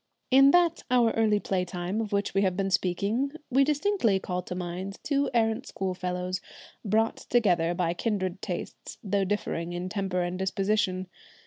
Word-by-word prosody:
In 270 +1 +8
that 340 +1 +4
our 240 -2 +4
early 215 -2 +2
play 190 -2 -1
time, 180 +4 -3
of 215 - -4
which 200 0 0
we 195 - +2
have 185 -2 +1
been 195 -1 0
speaking, 205 +10 0 0.2
we 270 +2 +5
distinctly 295 - +2
call 180 -1 -3
to 180 - -6
mind 180 +2 -5
two 280 -1 +1
errant 230 +2 +1
school 190 -1 -3
fellows, 180 0 -3 0.4
brought 220 +2 +1
together 175 -8 +1
by 170 -1 0
kindred 190 -1 -2
tastes, - - -6
though 200 -1 +1
differing 175 -4 -2
in 175 +1 -4
temper 190 -3 -1
and 175 +1 -3
disposition. 190 -1 0
195 Hz, 165 wpm, -28 LUFS, 180-225 Hz, 0.4 s, In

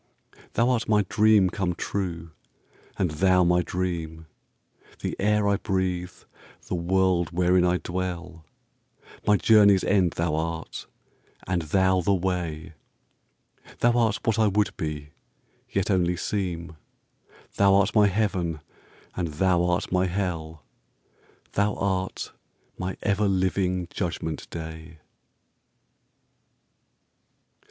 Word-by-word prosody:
Thou 115 - +2
art 115 -3 -1
my 105 -1 +4
dream 105 -3 +4
come 90 -2 -2
true, 85 -5 -4 0.7
and 90 -4 0
thou 90 +3 +3
my 90 +1 +3
dream; 85 -3 -4 0.8
The - - -3
air 105 +1 +2
I 100 0 +2
breathe, 95 -2 -2 0.6
the - - -4
world 90 0 +1
wherein 90 +1 +2
I 90 0 +2
dwell; 90 -2 -5 0.8
My 105 -1 +5
journey's 100 -4 +5
end 95 -4 +2
thou 85 -2 -1
art, 80 +1 -4 0.6
and 90 -1 0
thou 95 +3 +2
the 100 +3 +2
way; 85 -3 -3 1.1
Thou 120 - +5
art 115 -3 +2
what 115 0 +1
I 110 - +4
would 105 +1 +1
be, 75 -2 -5 0.6
yet 95 +1 -1
only 90 -2 +1
seem; 85 -5 -3 0.8
Thou 100 -1 +5
art 100 +1 +3
my 105 -2 +5
heaven 95 -5 -1 0.6
and 90 -2 -1
thou 85 +3 +1
art 90 +3 -1
my 90 0 +2
hell; 80 -5 -3 0.9
Thou 105 +1 +1
art 95 -1 -2 0.4
my 90 0 -4
ever 100 0 +1
living 95 -1 0
judgment 85 -4 -4
day. 80 0 -8
90 Hz, 115 wpm, -25 LUFS, 85-100 Hz, 1.1 s, My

